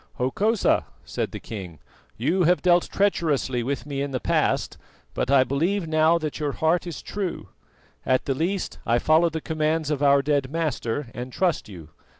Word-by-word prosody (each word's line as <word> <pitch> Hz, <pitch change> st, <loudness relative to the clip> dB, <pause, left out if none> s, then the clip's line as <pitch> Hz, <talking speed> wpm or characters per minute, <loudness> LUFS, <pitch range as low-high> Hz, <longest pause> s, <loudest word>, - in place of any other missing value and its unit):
"Hokosa," 200 Hz, -, +1 dB, 0.2 s
said -, -, -3 dB
the -, -, -6 dB
king, 95 Hz, -7 st, -8 dB, 0.4 s
"you 160 Hz, +11 st, +1 dB
have 180 Hz, +2 st, +3 dB
dealt 175 Hz, -1 st, +3 dB
treacherously 155 Hz, -10 st, +1 dB
with 135 Hz, +4 st, -3 dB
me 140 Hz, -2 st, -3 dB
in 140 Hz, -, -2 dB
the 130 Hz, -2 st, -2 dB
past, -, -, 0 dB, 0.3 s
but -, -, -2 dB
I 135 Hz, -2 st, +6 dB
believe 165 Hz, +8 st, 0 dB
now 155 Hz, +1 st, +4 dB
that 155 Hz, -2 st, -4 dB
your 145 Hz, -2 st, -1 dB
heart 170 Hz, +3 st, +1 dB
is 170 Hz, -, -6 dB
true; 195 Hz, -4 st, -4 dB, 0.5 s
at 130 Hz, 0 st, +1 dB
the 135 Hz, -, 0 dB
least 175 Hz, +7 st, -2 dB
I 115 Hz, -, +2 dB
follow 160 Hz, +6 st, +4 dB
the 160 Hz, -1 st, -4 dB
commands 155 Hz, -1 st, -1 dB
of 145 Hz, -2 st, -1 dB
our 140 Hz, -1 st, +4 dB
dead 140 Hz, -2 st, +1 dB
master 145 Hz, -5 st, -2 dB
and 125 Hz, +1 st, -6 dB
trust 175 Hz, -, 0 dB
you. 85 Hz, -6 st, -11 dB
150 Hz, 175 wpm, -24 LUFS, 130-170 Hz, 0.5 s, I